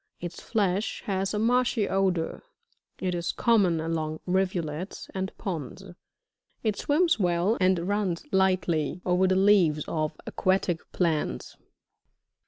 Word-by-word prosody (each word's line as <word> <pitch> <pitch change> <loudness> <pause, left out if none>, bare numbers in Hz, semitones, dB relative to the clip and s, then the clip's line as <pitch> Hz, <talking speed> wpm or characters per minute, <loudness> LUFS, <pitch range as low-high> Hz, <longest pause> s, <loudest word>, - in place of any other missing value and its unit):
Its 175 0 -7
flesh 205 -2 -1
has 195 -1 -1
a 210 - -2
marshy 230 -1 +2
odour. 185 -4 0 0.6
It 185 -1 -1
is 170 -1 -1
common 200 -8 +3
along 155 -1 -2
rivulets, 180 -2 -2
and 190 0 -3
ponds; 175 - -5 0.8
it 215 -3 +1
swims 320 - +2
well 180 +3 +2
and 185 -2 +2
runs 200 -4 -1
lightly 185 -4 +1
over 180 +1 +3
the 185 - +2
leaves 185 -6 +4
of 155 -1 -2
aquatic 185 -3 0
plants. 155 - -1
185 Hz, 120 wpm, -27 LUFS, 170-195 Hz, 0.8 s, leaves